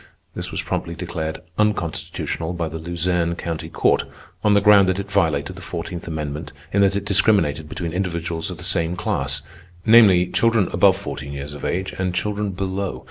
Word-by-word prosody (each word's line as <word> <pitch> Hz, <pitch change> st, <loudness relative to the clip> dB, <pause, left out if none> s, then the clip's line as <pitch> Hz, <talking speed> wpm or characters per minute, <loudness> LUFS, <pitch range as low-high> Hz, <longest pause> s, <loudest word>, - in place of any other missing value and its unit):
This -, -, -4 dB
was -, -, -3 dB
promptly 85 Hz, -, -3 dB
declared 80 Hz, -2 st, -4 dB, 0.2 s
unconstitutional 85 Hz, -4 st, -1 dB
by 85 Hz, -2 st, -2 dB
the 80 Hz, +1 st, -6 dB
Luzerne 85 Hz, 0 st, 0 dB
County 80 Hz, -1 st, -4 dB
Court, -, -, +2 dB, 0.4 s
on 105 Hz, -1 st, +4 dB
the -, -, +6 dB
ground 100 Hz, -2 st, +6 dB
that 95 Hz, -, +1 dB
it 100 Hz, 0 st, -5 dB
violated 80 Hz, -4 st, +1 dB
the 95 Hz, -, -10 dB
Fourteenth 85 Hz, 0 st, -5 dB
Amendment 75 Hz, -1 st, -4 dB, 0.2 s
in 100 Hz, -, +4 dB
that 100 Hz, 0 st, +4 dB
it 100 Hz, 0 st, -2 dB
discriminated 85 Hz, -7 st, +2 dB
between 85 Hz, 0 st, -4 dB
individuals 85 Hz, -3 st, -2 dB
of -, -, -6 dB
the -, -, -10 dB
same 85 Hz, +1 st, +1 dB
class—namely, 90 Hz, -, +2 dB
children 115 Hz, -5 st, +3 dB
above 95 Hz, +1 st, +5 dB
fourteen 70 Hz, -8 st, -6 dB
years 70 Hz, +1 st, -6 dB
of 70 Hz, -, -9 dB
age 95 Hz, +2 st, -2 dB
and 90 Hz, -1 st, -1 dB
children 105 Hz, +1 st, -1 dB
below. 95 Hz, 0 st, -3 dB
90 Hz, 175 wpm, -22 LUFS, 80-100 Hz, 0.4 s, the